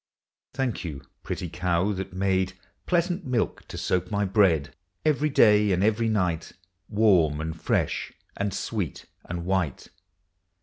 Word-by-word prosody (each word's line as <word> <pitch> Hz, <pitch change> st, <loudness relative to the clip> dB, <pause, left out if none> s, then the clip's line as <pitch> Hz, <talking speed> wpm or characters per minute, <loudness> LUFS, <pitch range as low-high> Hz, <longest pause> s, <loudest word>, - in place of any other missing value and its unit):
Thank 130 Hz, -6 st, -1 dB
you, 75 Hz, -6 st, -6 dB, 0.2 s
pretty 90 Hz, -, -4 dB
cow, 90 Hz, +3 st, 0 dB
that 95 Hz, -1 st, -4 dB
made 95 Hz, 0 st, 0 dB, 0.3 s
Pleasant 175 Hz, +1 st, +1 dB
milk 125 Hz, -5 st, -1 dB
to -, -, -7 dB
soak 90 Hz, 0 st, 0 dB
my 105 Hz, -1 st, 0 dB
bread. 90 Hz, -8 st, +3 dB, 0.3 s
Every 150 Hz, 0 st, +2 dB
day 105 Hz, -6 st, +5 dB
and 90 Hz, +1 st, +2 dB
every 110 Hz, +2 st, +2 dB
night. 90 Hz, -6 st, 0 dB, 0.4 s
Warm, 95 Hz, -9 st, +4 dB
and 80 Hz, 0 st, -3 dB
fresh, -, -, -1 dB, 0.2 s
and 100 Hz, 0 st, -1 dB
sweet, 100 Hz, -3 st, -3 dB, 0.2 s
and 85 Hz, 0 st, -5 dB
white. 90 Hz, -7 st, -1 dB
95 Hz, 135 wpm, -26 LUFS, 85-110 Hz, 0.4 s, day